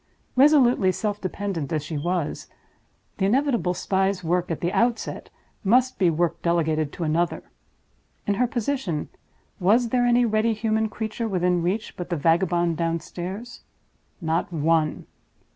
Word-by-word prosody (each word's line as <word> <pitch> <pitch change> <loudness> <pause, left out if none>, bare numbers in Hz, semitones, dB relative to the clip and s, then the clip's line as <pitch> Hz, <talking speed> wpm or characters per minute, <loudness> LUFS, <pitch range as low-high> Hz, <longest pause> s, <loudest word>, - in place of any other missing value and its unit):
Resolutely 255 -8 +5
self 205 +3 -3
dependent 185 -6 -3
as 155 -3 -1
she 160 - -5
was, 170 +2 -2 0.7
the 190 - +2
inevitable 235 -6 +1
spy's 190 0 0
work 175 +2 0
at 165 - -2
the 175 +1 -1
outset 235 0 0 0.3
must 250 +5 +3
be 180 -3 +4
work 170 +1 0
delegated 160 -3 +1
to 175 - -4
another. 165 +2 0 0.8
In 205 - +1
her 245 +5 +1
position, 240 - -2 0.5
was 225 +6 +3
there 245 0 +2
any 240 0 +4
ready 220 0 +2
human 220 0 0
creature 220 +2 -4
within 180 -3 +1
reach 195 +6 -2
but 180 - -5
the 175 - -1
vagabond 170 +2 +2
downstairs? 175 +7 -4 0.6
Not 165 0 -1
one. 160 -1 +1
185 Hz, 140 wpm, -24 LUFS, 170-225 Hz, 0.8 s, Resolutely